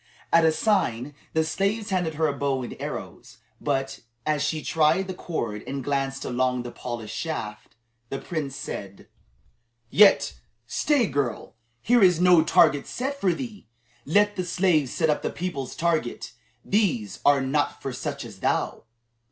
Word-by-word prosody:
At 165 -1 +6
a 160 - +5
sign, 150 - 0 0.2
the 160 - +3
slaves 200 +7 -1
handed 175 -4 0
her 160 +1 +1
a 145 - +1
bow 135 -2 -1
and 120 - -6
arrows. - - -7 0.2
But, 135 -2 -1 0.3
as 150 -2 +1
she 155 0 -1
tried 165 +4 +2
the 190 - -4
cord 115 - -4
and 135 0 -4
glanced 135 0 -1
along 125 0 0
the 120 - -6
polished 120 -4 -6
shaft, 110 -10 -5 0.3
the 135 - -3
prince 150 -5 -4
said: 100 -6 -7 0.8
"Yet, 145 -9 +6 0.3
stay, 275 - +2
girl; 140 - -2 0.3
here 240 0 +4
is 180 -4 +5
no 180 -2 +6
target 160 -5 +4
set 275 +3 -4
for 185 - +3
thee. 210 - -6 0.4
Let 205 +7 +3
the 185 - 0
slaves 175 -6 +2
set 160 -2 +2
up 150 - -1
the - - -1
people's 145 -6 -4
target. 160 -8 -1 0.3
These 145 - 0
are 145 -1 +5
not 140 +3 0
for 135 - -5
such 140 +1 -4
as 105 -5 -11
thou." - - -1
155 Hz, 160 wpm, -25 LUFS, 135-180 Hz, 0.8 s, At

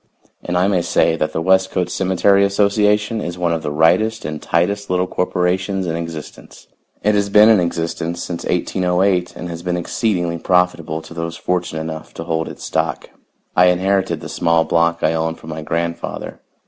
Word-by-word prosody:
And 90 0 -1
I 90 +2 +3
may 95 -3 +2
say 85 -1 +2
that 75 - -1
the 80 - -2
Westcote 95 -1 +2
Cemetery 95 +1 +3
Association 105 +2 +2
is 85 -2 -5
one 85 -1 0
of 80 - -2
the - - -3
rightest 90 +9 +2
and 75 0 -5
tightest 100 +4 0
little 90 0 +1
corporations 95 +2 -1
in 80 -2 -2
existence. 85 -2 -8 0.4
It 105 - +3
has 100 -1 +1
been 105 +2 +7
in 110 -3 +6
existence 85 0 -2
since 85 -1 -5
1808 90 +1 0
and 90 - -6
has 85 -1 -6
been 90 0 -2
exceedingly 85 -2 -1
profitable 85 -3 0
to 80 - -11
those 85 0 -4
fortunate 90 -3 -2
enough 80 0 -7
to 80 - -5
hold 80 -1 -2
its - - -10
stock. - - -2 0.4
I 90 - +6
inherited 95 +2 +1
the - - -7
small 85 -1 +2
block 85 0 +1
I 80 - +3
own 80 0 -1
from 80 - -10
my 80 0 -5
grandfather. 85 +2 -4
90 Hz, 180 wpm, -19 LUFS, 85-95 Hz, 0.4 s, been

